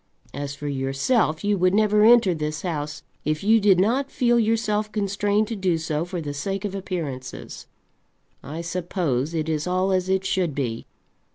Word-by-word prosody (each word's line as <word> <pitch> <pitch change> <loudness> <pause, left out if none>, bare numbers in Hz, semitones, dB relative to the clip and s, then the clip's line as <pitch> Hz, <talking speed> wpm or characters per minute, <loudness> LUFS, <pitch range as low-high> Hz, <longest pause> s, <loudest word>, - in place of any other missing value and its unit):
As 140 0 -5
for 145 +1 -6
yourself 140 - 0
you 205 -1 +1
would 185 +2 +3
never 210 0 +4
enter 225 -4 +6
this 155 -1 -4
house 150 -4 -4 0.2
if 155 +3 -1
you 220 +2 +5
did 200 -3 +4
not 255 +8 +1
feel 240 -2 +2
yourself 215 -1 0
constrained 205 0 0
to 230 - -3
do 185 -4 +1
so 160 0 -2
for 175 0 -5
the 145 -3 -4
sake 195 +7 -3
of 200 - -3
appearances. 160 -10 -6 0.7
I 155 +5 -6
suppose 170 -4 -2
it 155 -1 -1
is 155 +1 -1
all 185 +1 +1
as 185 0 0
it 190 0 +1
should 185 -6 0
be. 120 -5 -3
185 Hz, 175 wpm, -24 LUFS, 150-205 Hz, 0.7 s, enter